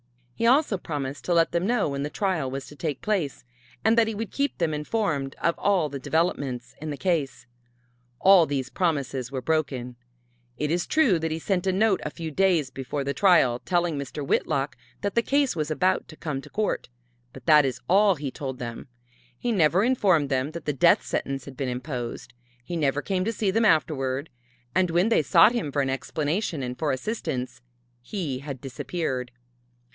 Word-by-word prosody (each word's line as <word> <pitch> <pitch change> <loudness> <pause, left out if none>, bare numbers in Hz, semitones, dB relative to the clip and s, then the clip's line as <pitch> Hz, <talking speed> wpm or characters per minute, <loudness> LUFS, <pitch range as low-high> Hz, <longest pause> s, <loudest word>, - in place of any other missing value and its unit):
He 230 - 0
also 255 - +3
promised 140 -4 -4
to 175 - +1
let 165 -1 +4
them 175 +2 0
know 235 -8 +1
when 140 0 -3
the 145 - -2
trial 170 -7 -1
was 135 0 -5
to 150 - -12
take 150 -3 -4
place, 190 -10 -1 0.4
and 220 +1 +5
that 230 -1 +4
he 220 - -3
would 225 +1 -4
keep 280 +1 -1
them 165 -3 0
informed 150 -4 -1
of 170 - +2
all 195 -6 +2
the 140 0 -5
developments 140 -5 -1
in 155 - -4
the 145 - -4
case. 145 -10 -1 0.7
All 185 -4 +6
these 135 -2 -2
promises 140 -7 -1
were 130 -2 -4
broken. 135 -5 -1 0.6
It 150 +2 -1
is 175 +1 0
true 255 - +3
that 160 0 -1
he 160 - -2
sent 185 +2 -1
a - - +4
note 195 +1 +2
a - - -2
few 160 +1 -6
days 170 -5 +2
before 135 +2 -4
the 140 +1 -2
trial 140 -8 +4
telling 175 -1 0
Mr. 140 +1 -5
Whitlock 140 0 0 0.3
that 200 -1 -1
the 235 - +3
case 280 0 +1
was 155 -2 -2
about 180 +4 +1
to 155 - -12
come 150 -4 -4
to - - -13
court, 215 0 -2 0.4
but - - -13
that 150 -1 +7
is 130 -2 -2
all 200 +1 +5
that 145 - -13
he 140 -3 -3
told 130 -2 -5
them. 120 0 -6 0.5
He 240 - -1
never 180 -1 +3
informed 190 - +3
them 130 +1 0
that 170 -1 -7
the 150 - 0
death 135 - +4
sentence 135 -2 -3
had 140 - -10
been 130 0 -2
imposed. 125 -1 -5 0.3
He 175 - -5
never 145 -2 0
came 185 -2 0
to 225 - +1
see 210 -3 0
them 225 +3 +2
afterward. 145 -5 +1 0.4
And 185 -1 +2
when 175 +6 +2
they 230 - +4
sought 165 - +6
him 215 -12 -2
for 140 0 +1
an 135 - -1
explanation 155 +3 -2
and 125 0 -5
for 150 -2 +1
assistance, 130 - -3 0.4
he 145 - -4
had 140 -1 -7
disappeared. 130 -1 -3
155 Hz, 200 wpm, -26 LUFS, 135-190 Hz, 0.7 s, that